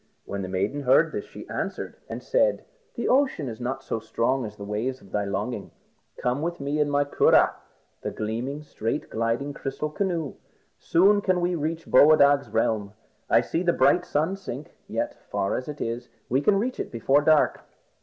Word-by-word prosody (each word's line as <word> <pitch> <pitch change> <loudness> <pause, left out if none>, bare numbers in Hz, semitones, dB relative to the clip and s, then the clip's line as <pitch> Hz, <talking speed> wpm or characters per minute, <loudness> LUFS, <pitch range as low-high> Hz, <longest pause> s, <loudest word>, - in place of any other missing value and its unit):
When 100 0 -4
the 95 - -4
maiden 100 +10 -1
heard 140 +5 +4
this, - - -4
she - - -11
answered - - -4
and - - -6
said - - +2 0.3
"The - - -2
ocean 260 - +2
is 115 0 -7
not 130 +2 -3
so 115 - -2
strong 115 +3 0
as 105 - -10
the 100 - -9
waves 115 +6 -2
of 95 - -18
thy 105 -1 0
longing. 100 +2 -3 0.5
Come 125 +3 -1
with 170 +2 -3
me 140 +2 -2
in 150 -1 +2
my 145 0 +3
curragh, 140 - +4 0.5
the - - -3
gleaming, 120 +7 -4
straight 115 -1 -3
gliding 115 +6 -1
crystal 140 +3 -4
canoe. 170 -5 -2 0.5
Soon 195 +5 +4
we - - 0
can 185 -2 +1 0.2
reach 160 +2 -2
Boadag's 140 -2 +6
realm. 105 -2 0 0.4
I - - +5
see 165 - -2
the 175 -1 +2
bright 180 - +4
sun 160 +2 0
sink, 150 -7 -8
yet - - -3
far 95 - 0
as 130 - -4
it 150 -1 -6
is, 120 +1 -4 0.2
we 130 +3 +2
can 195 +7 +3
reach 245 +5 -2
it - - -4
before 135 +5 +3
dark. 155 0 +3
140 Hz, 185 wpm, -26 LUFS, 115-160 Hz, 0.5 s, Boadag's